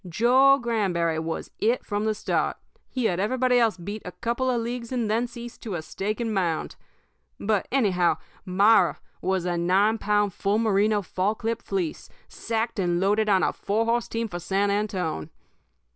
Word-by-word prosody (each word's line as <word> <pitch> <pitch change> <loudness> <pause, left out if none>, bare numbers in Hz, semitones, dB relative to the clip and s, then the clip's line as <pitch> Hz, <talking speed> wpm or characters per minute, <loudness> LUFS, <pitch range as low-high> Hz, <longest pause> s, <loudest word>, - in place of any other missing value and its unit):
Joe 255 +9 +5
Granberry 190 - 0
was 160 0 -4
It 235 +3 +1
from 205 0 -2
the 215 -1 +1
start. - - -1 0.3
He 255 -3 -2
had 180 -4 +1
everybody 250 +4 +2
else 225 -5 +2
beat 205 +5 -6
a 180 - -7
couple 240 +3 -1
of 245 -2 +1
leagues 235 +1 -4
and 235 -4 -1
thence 235 +2 -1
east 240 0 -9
to 210 -5 -4
a 160 - -4
stake 210 +7 -3
and 230 -2 -1
mound. 175 -5 -1 0.6
But, 205 -1 0
anyhow, 190 -10 +2 0.3
Myra 200 +4 +4 0.2
was 190 -2 0
a 175 -1 0
nine 195 +6 +2
pound, 205 -1 +1
full 200 +3 0
merino, 210 -1 +2
fall 190 +4 -1
clip 230 +1 -3
fleece, 185 -5 -3 0.2
sacked 225 -1 -3
and 175 -2 +1
loaded 210 +3 +2
on 190 -2 +4
a - - +1
four 215 +3 -1
horse 235 +1 +1
team 230 0 -2
for 175 -4 -6
San 195 +3 0
Antone. 190 - -2
210 Hz, 175 wpm, -25 LUFS, 190-230 Hz, 0.6 s, Joe